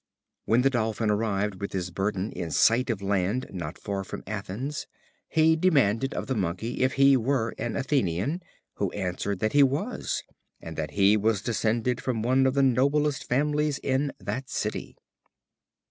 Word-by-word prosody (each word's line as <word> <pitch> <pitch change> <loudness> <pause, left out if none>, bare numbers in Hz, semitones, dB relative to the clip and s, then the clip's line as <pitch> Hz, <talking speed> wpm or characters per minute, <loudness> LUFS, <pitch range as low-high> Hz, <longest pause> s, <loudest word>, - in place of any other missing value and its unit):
When 120 +3 +3
the 135 - +4
Dolphin 110 -3 0
arrived 105 -2 -1
with 100 - -4
his 90 -1 -3
burden 95 +2 -2
in 85 -2 -5
sight 120 +9 +3
of 105 -4 -2
land 100 +5 0
not 85 -3 -5
far 100 -1 -3
from - - -7
Athens, 110 +8 -4 0.4
he 160 0 +4
demanded 135 - +2
of - - -3
the 130 - -1
Monkey 100 +3 -2
if 130 0 +2
he 135 0 +6
were 120 -2 0
an 120 +1 -2
Athenian, 135 - 0 0.4
who - - 0
answered 95 +1 -2
that 110 - 0
he 145 - +6
was, 145 - 0 0.4
and 80 -1 -8
that 75 -1 -3
he 100 +1 +6
was 105 -1 +1
descended 115 +1 0
from 115 -4 -2
one 130 +2 +3
of 130 - 0
the 140 - +4
noblest 140 +2 +2
families 150 +2 +1
in 135 +1 +1
that 130 0 -4
city. - - -3
115 Hz, 165 wpm, -27 LUFS, 100-135 Hz, 0.4 s, he